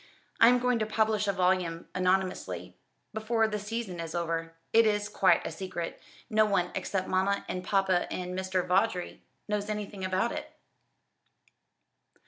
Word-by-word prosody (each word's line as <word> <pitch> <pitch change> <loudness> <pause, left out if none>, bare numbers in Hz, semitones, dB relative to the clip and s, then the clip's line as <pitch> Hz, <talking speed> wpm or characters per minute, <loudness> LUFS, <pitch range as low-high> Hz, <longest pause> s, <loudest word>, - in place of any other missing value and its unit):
I 230 - +8
am 250 - +5
going 250 -1 +1
to 215 - 0
publish 215 -1 +1
a - - +4
volume, 180 -3 0
anonymously, 185 0 -1 0.4
before 220 +1 +1
the 210 -1 -3
season 210 -3 -4
is 165 0 -5
over. 165 -1 -2 0.2
It 230 0 +6
is 210 -1 +1
quite 195 -2 +3
a - - -3
secret. 185 -3 -5 0.3
No 215 -2 +4
one 195 -4 +1
except 190 -2 -2
mamma 190 +2 +1
and 180 - -4
papa, 190 -2 +1
and 180 0 -4
Mr. 185 -1 -1
Vawdrey 180 0 0 0.3
knows 210 0 -2
anything 205 -2 -4
about 185 +5 +1
it." - - -6
195 Hz, 150 wpm, -29 LUFS, 180-215 Hz, 0.4 s, I